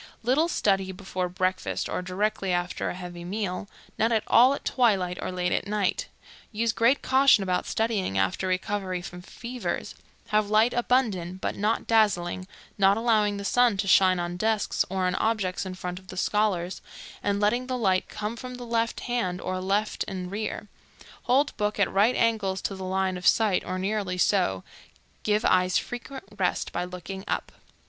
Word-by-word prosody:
Little 270 +8 +3
study 195 - +1
before 185 -1 -4
breakfast 185 +1 -1
or - - -2
directly 195 +2 -1
after 175 0 -1
a - - -4
heavy 175 -1 -8
meal; 195 +1 -3 0.3
none 225 +2 +3
at 220 -2 +2
all 255 +4 +6
at - - -10
twilight 195 -8 +1
or - - -3
late 180 -1 -1
at - - 0
night; 205 -2 0 0.4
use 225 +1 0
great 235 +5 +3
caution 265 -5 +5
about 180 -1 -1
studying 215 - -1
after 95 - 0
recovery 185 -1 -2
from 180 0 -8
fevers; 240 +6 -5 0.4
have 210 -1 +2
light 220 +3 +4
abundant, 215 -8 0
but - - -2
not 215 +3 0
dazzling, 185 -5 +1 0.3
not 195 +1 +5
allowing 215 -3 +2
the 200 - -6
sun 240 0 +3
to 195 - -1
shine 185 -1 +5
on 175 0 -3
desks 215 +1 +1
or 190 0 -1
on 180 - +1
objects 200 -4 -1
in 185 - -6
front 180 0 -5
of 190 - -21
the 185 - -9
scholars, 190 -3 0 0.4
and 200 0 0
letting 240 +5 +1
the 255 -1 -2
light 190 -5 +1
come 215 +2 -4
from 250 +1 -7
the 245 -1 -8
left 230 -1 -1
hand 235 -8 -1
or 185 -1 -3
left 200 +3 0
and 185 -2 -5
rear; 210 +1 -4 0.6
hold 275 +4 +2
book 210 0 -1
at 200 - +2
right 210 +6 +4
angles 215 -5 +1
to - - -2
the 190 - -7
line 190 0 0
of 180 - -2
sight 210 -5 +3
or 185 +1 -3
nearly 195 -1 -2
so; 180 - +2 0.6
give 210 0 +1
eyes 185 0 +3
frequent 255 +2 -5 0.2
rest 185 - 0
by - - -2
looking 180 +2 -7
up. - - -2
200 Hz, 180 wpm, -26 LUFS, 185-225 Hz, 0.6 s, all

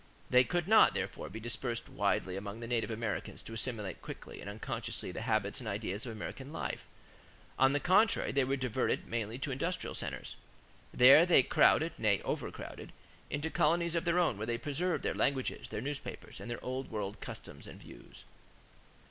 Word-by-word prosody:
They 125 0 +7
could 175 +3 -1
not, 220 +2 +7
therefore, - - -3
be 110 - -7
dispersed 120 +1 -3
widely 95 -1 0
among 100 +2 -5
the 115 - -6
native 115 -1 -1
Americans 110 -2 -3
to 115 - -9
assimilate 110 -5 -3
quickly - - -9
and - - -6
unconsciously 100 -3 -4
the 90 - -5
habits 110 -3 0
and 120 -4 -5
ideas 105 +2 -3
of - - -4
American 130 +5 -7
life. 165 - -4 0.7
On 135 +1 +5
the 145 - +2
contrary, 190 +9 +4
they 140 0 +2
were 135 +2 +1
diverted 130 -2 0
mainly 115 0 -3
to 135 - -3
the - - 0
industrial 165 +8 -2
centers. - - -5 0.5
There 135 +6 +8
they 170 -7 +6
crowded - - +4
nay, - - +3
overcrowded - - -5 0.4
into 145 +3 -2
colonies 170 +2 +2
of 170 +1 0
their 170 +1 +2
own 175 - +2
where 110 - -3
they 120 -1 0
preserved 160 +7 -1
their - - 0
languages, 135 -2 -1
their 105 - -4
newspapers, 140 +2 -6
and - - -7
their 120 - -5
old 130 +1 -3
world 105 -2 -4
customs - - -9
and - - -10
views. - - -13
125 Hz, 180 wpm, -33 LUFS, 110-145 Hz, 0.7 s, There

